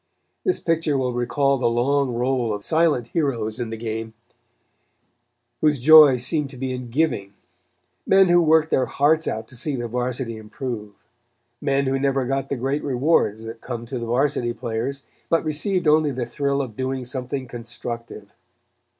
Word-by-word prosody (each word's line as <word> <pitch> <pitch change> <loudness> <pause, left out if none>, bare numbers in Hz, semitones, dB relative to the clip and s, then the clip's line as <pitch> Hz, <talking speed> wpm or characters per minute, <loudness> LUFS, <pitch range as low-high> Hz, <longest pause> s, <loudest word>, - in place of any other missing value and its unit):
This 370 - +1
picture 165 -3 0
will 125 -2 -1
recall 135 +3 +1
the 120 -2 +2
long 130 +2 +1
roll 120 -3 0
of 100 - -8
silent 155 -7 +1
heroes 120 -8 -1
in 120 -2 -3
the 115 - -5
game, 110 0 -5 1.4
whose 150 -3 +2
joy 150 0 +8
seemed 140 +4 -1
to 135 - -12
be 130 0 -3
in 125 -1 -6
giving; 115 -8 -1 0.7
men 195 0 +6
who 175 0 +5
worked 160 -1 +3
their 130 - +2
hearts 155 +3 +2
out 110 0 -3
to - - -13
see 140 +4 -3
the 120 -2 -3
Varsity 120 -1 -3
improve; 110 -1 -6 0.7
men 140 -1 +1
who 135 0 0
never 135 -1 +1
got 135 +1 -2
the 140 - -1
great 135 +4 -1
rewards 130 -5 +1
that 115 0 -8
come 120 -2 -6
to 125 +1 -5
the 115 - -5
Varsity 125 -1 +1
players, 120 +4 -4 0.3
but 165 -1 +2
received 175 +3 -1
only 155 0 +4
the 130 -3 -3
thrill 140 +3 -1
of 115 -5 -8
doing 130 0 -3
something 130 +1 -4
constructive. 115 -3 -8
130 Hz, 165 wpm, -23 LUFS, 120-145 Hz, 1.4 s, joy